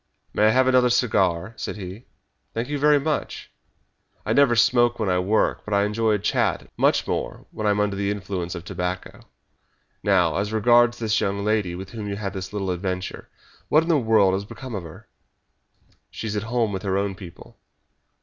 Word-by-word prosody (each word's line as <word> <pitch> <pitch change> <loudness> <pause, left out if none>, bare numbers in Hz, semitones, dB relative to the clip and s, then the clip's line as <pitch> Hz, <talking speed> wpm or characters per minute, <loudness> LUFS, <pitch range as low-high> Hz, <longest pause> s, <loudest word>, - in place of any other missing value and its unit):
"May 105 - +4
I - - +6
have 130 +4 +4
another 125 -1 +4
cigar?" 100 -6 +1
said - - -4
he. 100 +3 -8 0.5
"Thank 115 +3 -2
you 145 -1 -2
very 150 0 +5
much! 150 +1 -3 0.7
I - - +1
never 140 -4 +4
smoke 120 +1 +3
when 110 -4 -1
I 90 0 +2
work, 100 +4 +1
but 105 - -2
I 100 - +3
enjoy 110 +1 +1
a - - +2
chat 100 - 0
much - - +2
more - - -4
when 110 - -3
I - - +4
am 105 0 +1
under 105 -1 0
the 100 0 -1
influence 95 -3 -4
of 85 0 -8
tobacco. 90 0 -4 0.8
Now, 90 -5 +2
as 100 +2 -1
regards 120 +2 +4
this 110 -2 0
young 100 +1 -1
lady, 105 -5 0
with 95 +1 -8
whom 110 -3 -6
you 100 - -3
had 100 -1 -4
this 95 -1 -6
little 100 -3 -2
adventure. 90 0 -4 0.4
What 155 +2 +5
in 165 - -5
the 165 - +4
world 110 -5 +3
has 95 +1 -1
become 130 +4 -9
of 100 - -3
her?" 80 -2 -12 1.0
"She - - -7
is 105 -1 -3
at 105 - -1
home 115 -3 +1
with 95 - -3
her 95 -1 -1
own 100 0 -1
people." 90 -2 -13
105 Hz, 200 wpm, -23 LUFS, 95-115 Hz, 1.0 s, I